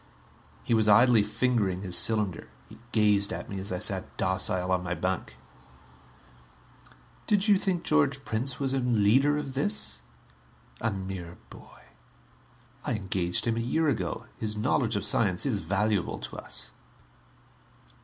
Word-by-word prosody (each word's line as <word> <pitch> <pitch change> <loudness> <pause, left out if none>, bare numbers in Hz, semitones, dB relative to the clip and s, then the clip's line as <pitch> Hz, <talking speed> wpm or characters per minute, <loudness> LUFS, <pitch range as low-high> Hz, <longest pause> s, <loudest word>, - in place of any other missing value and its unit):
He - - -1
was 110 -1 +3
idly 115 +2 +6
fingering 105 -3 0
his 90 -2 -1
cylinder; 105 -5 +1 0.2
he - - -15
gazed 105 -2 +2
at - - -6
me 100 - -4
as 95 0 -4
I 90 - -1
sat - - -2
docile 95 0 -1
on 90 -1 +2
my 90 -1 -3
bunk. 95 0 -3 1.9
"Did 205 0 +2
you 205 - +6
think 180 -4 -1
George 140 -3 +1
Prince 125 +4 +1
was 135 -1 0
a 135 - +1
leader 125 +4 +3
of 140 -3 -5
this? 70 - +1 0.8
A 115 - +1
mere 95 -3 -6
boy. - - -15 1.0
I 145 - -2
engaged 95 -4 -1
him 115 -1 0
a - - 0
year 150 +7 +1
ago 90 - -3
his 110 -1 -3
knowledge 115 0 0
of 100 0 -1
science 100 -3 +2
is 120 -8 0
valuable 100 +2 -1
to - - -7
us." - - -4
105 Hz, 145 wpm, -28 LUFS, 95-125 Hz, 1.9 s, idly